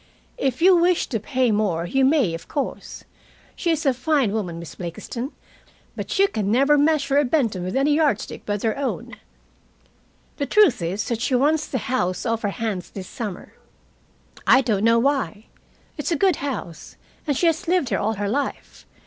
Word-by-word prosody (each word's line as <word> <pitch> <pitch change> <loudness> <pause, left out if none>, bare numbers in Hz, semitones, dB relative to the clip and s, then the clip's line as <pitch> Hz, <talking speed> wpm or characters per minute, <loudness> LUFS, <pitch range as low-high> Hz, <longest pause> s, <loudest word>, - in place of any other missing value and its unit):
"If 265 +3 -1
you 370 0 +7
wish 350 0 +3
to 225 - -1
pay 255 +2 0
more, 200 -6 0
you 270 +10 +1
may, 265 - +3
of 165 0 -7
course. 280 - -5 0.5
She 345 - -2
is 320 -1 0
a 270 - +4
fine 265 -3 +1
woman, 190 -6 -3
Miss 170 -1 -8
Blakiston, 235 - -6 0.6
but - - -4
you 395 +1 +5
can 210 - -2
never 275 +5 +4
measure 290 -2 +2
a - - +3
Benton 245 - 0
with 185 +1 -4
any 280 +2 +3
yard 295 -8 +2
stick - - -8
but 205 -1 -3
their 220 -1 0
own. 275 - -3 1.2
The 280 - -2
truth 360 - +4
is 185 +5 -2
that 230 -2 -2
she 255 - +1
wants 295 +4 +2
the 260 - -2
house 220 -6 -1
off 230 -1 0
her 205 - 0
hands 200 -3 -4
this 190 -2 -8
summer. 210 -7 -7 0.9
I 265 - +7
don't 215 -6 0
know 230 +1 +5
why. 230 - 0 0.5
It's 295 - -2
a - - +3
good 370 +1 +2
house, 255 - -6 0.3
and 285 -3 +1
she 350 - +1
has 335 +2 +1
lived 350 -7 +1
here 195 - 0
all 220 +2 0
her 205 -1 -3
life. 280 +7 -4
250 Hz, 190 wpm, -23 LUFS, 205-290 Hz, 1.2 s, you